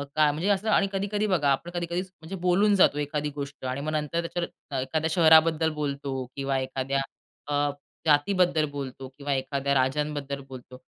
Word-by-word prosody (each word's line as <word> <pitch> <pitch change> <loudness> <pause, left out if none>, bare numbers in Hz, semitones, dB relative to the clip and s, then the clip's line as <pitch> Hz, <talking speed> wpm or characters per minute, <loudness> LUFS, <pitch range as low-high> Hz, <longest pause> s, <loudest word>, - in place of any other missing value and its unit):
काय 150 -1 +4
म्हणजे 160 +7 -2
असं 205 +2 +1
आणि 195 - +4
कधी-कधी 205 +2 -1
बघा 160 -7 +2
आपण 170 +6 -1
कधी-कधी 175 +1 -2
म्हणजे 185 -1 -9
बोलून 200 +3 +4
जातो 165 -6 +4
एखादी 150 0 -2
गोष्ट 140 -2 -6
आणि 130 +2 -2
मग 155 +1 -2
नंतर 155 +2 -1
त्याच्यावर 170 -5 -4
एखाद्या 155 +5 -1
शहराबद्दल 160 -1 +5
बोलतो 140 -3 -3
किंवा 135 -1 -1
एखाद्या 135 +1 -2 0.5
अ, 145 - -2 0.5
जातीबद्दल 160 +1 +3
बोलतो 135 -2 -6
किंवा 140 0 -2
एखाद्या 135 +1 -1
राज्यांबद्दल 140 +1 0
बोलतो 130 0 -10
150 Hz, 160 wpm, -27 LUFS, 140-170 Hz, 0.5 s, शहराबद्दल